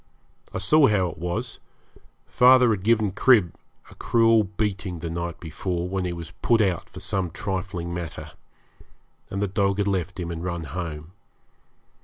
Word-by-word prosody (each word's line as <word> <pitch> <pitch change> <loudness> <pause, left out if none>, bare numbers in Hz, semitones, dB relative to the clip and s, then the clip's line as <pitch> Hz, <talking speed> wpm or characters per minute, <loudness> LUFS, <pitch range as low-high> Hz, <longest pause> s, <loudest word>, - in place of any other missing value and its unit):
I - - -4
saw 140 +10 +4
how 95 -4 +2
it - - -13
was; 105 +8 -4 0.7
father 125 -1 +5
had 105 -4 -1
given 110 -1 +2
Crib 105 -3 +4 0.4
a - - -12
cruel 115 -2 +3
beating 100 -2 -3
the 80 0 -5
night 85 -1 -4
before, 85 +2 -3
when 95 0 -2
he 90 - -2
was 85 -1 -8
put 115 -1 +3
out 95 -6 0
for - - -10
some 95 -2 -2
trifling 90 -1 -4
matter, 80 -3 -6 1.0
and 100 +1 -2
the - - 0
dog 100 +1 0
had 100 -1 0
left 95 -1 -2
him 85 -1 -4
and 85 0 -5
run 85 -2 -3
home. 80 0 -6
95 Hz, 165 wpm, -24 LUFS, 85-105 Hz, 1.0 s, father